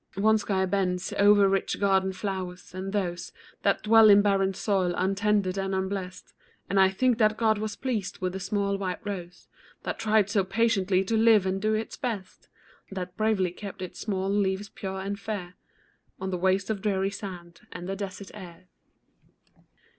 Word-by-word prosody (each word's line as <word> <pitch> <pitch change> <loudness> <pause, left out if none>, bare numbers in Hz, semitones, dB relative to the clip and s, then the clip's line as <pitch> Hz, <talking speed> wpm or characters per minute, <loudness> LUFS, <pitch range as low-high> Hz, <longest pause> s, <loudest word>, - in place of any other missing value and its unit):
One 220 +2 +3
sky 195 -2 0
bends 185 -1 -1
o'er 205 0 +5
rich 195 0 0
garden 190 -1 +2
flowers, 185 -2 -5
and 190 +1 -5
those 180 -4 -2 0.3
That - - +1
dwell 220 0 +7
in 205 0 +7
barren 195 -1 +2
soil, 185 -4 0
untended 195 0 +1
and 195 0 -1
unblest; 190 -1 -4 0.4
And 200 - +3
I 190 0 +6
think 245 +5 +1
that 215 -1 +3
God 220 -2 +2
was 215 -1 -3
pleased 225 -7 -3
with 185 -1 -3
the 190 - -4
small 200 +1 -1
white 185 -2 -2
rose, 180 -4 -6 0.4
That - - -4
tried 215 -2 +3
so 205 -2 +1
patiently 195 -2 +1
to 225 +4 -1
live 220 -3 +5
and 190 +1 -1
do 215 +1 +1
its 220 +1 -4
best; 220 -8 -5 0.4
That 185 -2 -6
bravely 215 -5 +1
kept 195 0 -8
its 180 - -8
small 195 -2 -2
leaves 200 0 0
pure 190 -1 -5
and 200 +1 -4
fair 200 -4 -5 0.7
On 190 0 -3
the - - -1
waste 190 +3 +1
of 205 -3 -3
dreary 195 -1 0
sand, 175 -4 -8
and 175 - -7
the 195 - -2
desert 195 -1 -7
air. 180 -2 -12
195 Hz, 175 wpm, -27 LUFS, 185-210 Hz, 0.7 s, dwell